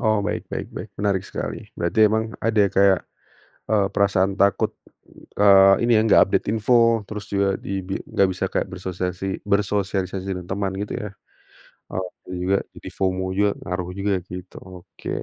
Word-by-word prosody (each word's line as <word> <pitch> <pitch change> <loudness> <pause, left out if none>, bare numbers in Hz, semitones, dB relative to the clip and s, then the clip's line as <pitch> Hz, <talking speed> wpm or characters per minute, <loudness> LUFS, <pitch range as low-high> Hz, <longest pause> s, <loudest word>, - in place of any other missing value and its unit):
Oh 110 -2 +2
baik - - -3
baik - - -5
baik, 95 - -7
menarik 100 -2 +1
sekali, - - -6
berarti 85 +4 -2
emang 110 +1 +1 0.2
ada 115 -1 0
ya 100 - +2
kayak, 95 -1 +5 0.7
eee, 105 -2 +3
perasaan 100 -1 +2
takut, 100 0 +2 0.7
eee, 100 -1 +8
ini 120 - +1
ya, - - +5
enggak 110 - +6
update - - 0
info, 115 +1 +3
terus 105 -2 -6
juga 100 -1 +1
di 95 0 -2
bi 95 +1 -4
enggak 100 -1 +2
bisa 90 - -3
kayak - - -1
bersosiasi 95 0 -4
bersosialisasi 100 -2 0
dengan 90 - -7
teman 95 +2 -2
gitu 100 +1 -4
ya. 105 - -4 0.8
Oh 95 - -3 0.2
tuh 90 - -5
juga, 90 +2 +1 0.2
jadi - - -9
FOMO 95 -1 -1
juga, 100 +2 +2
ngaruh 90 0 -3
juga 100 +1 0 0.2
gitu, 90 +1 -9 0.3
oke. 95 - -12
100 Hz, 170 wpm, -23 LUFS, 95-105 Hz, 0.8 s, eee